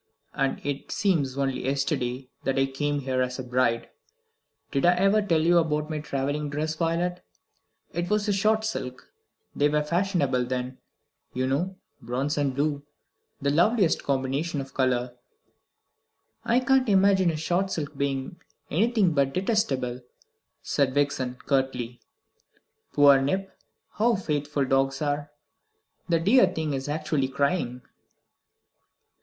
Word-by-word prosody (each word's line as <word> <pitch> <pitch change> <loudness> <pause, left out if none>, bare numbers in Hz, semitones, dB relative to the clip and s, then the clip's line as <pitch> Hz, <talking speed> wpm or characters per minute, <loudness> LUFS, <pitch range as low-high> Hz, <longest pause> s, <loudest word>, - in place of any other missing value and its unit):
And 135 0 0
it 140 -1 -4
seems 155 -11 0
only 135 -2 -1
yesterday 135 -2 -1 0.2
that 135 0 0
I 135 - +4
came 145 +2 -2
here 130 -1 -1
as 125 0 -2
a 130 - -4
bride. 125 -2 0 0.8
Did 135 - 0
I 175 +1 +5
ever 195 +4 +3
tell 170 -6 +2
you 170 +2 +5
about 150 -1 -1
my 155 - -2
travelling 145 +1 -2
dress, 155 +2 -2
Violet? 170 +2 -1 0.7
It 175 +1 -2
was 210 0 +1
a 205 - +2
shot 215 +3 +2
silk 130 - -5 0.4
they 145 +1 +3
were 150 0 +1
fashionable 170 -6 0
then, 125 0 -4 0.6
you 130 0 0
know 165 +9 -1 0.3
bronze 135 +5 -2
and 140 -3 0
blue 145 0 0 0.6
the 140 -1 0
loveliest 180 +3 +3
combination 140 +3 -1
of 135 0 -7
colour!" 125 -2 0 1.3
"I 240 +2 +2
can't 260 -1 +3
imagine 190 -2 +4
a 160 - -2
shot 180 +5 0
silk 145 -3 -4
being 140 +4 -3 0.3
anything 205 0 +2
but 140 -2 +1
detestable," 140 - 0 0.6
said 135 -2 0
Vixen 140 -3 0
curtly. 130 -3 -1 0.9
"Poor 140 -2 +6
Nip! 190 +8 -2 0.4
How 230 +2 +2
faithful 150 -5 -1
dogs 135 +1 +1
are! 145 0 -1 0.8
The 165 -1 +3
dear 200 +5 +5
thing 160 -5 -2
is 135 +1 -3
actually 150 -2 0
crying!" 135 -2 -1
145 Hz, 135 wpm, -26 LUFS, 135-175 Hz, 1.3 s, Poor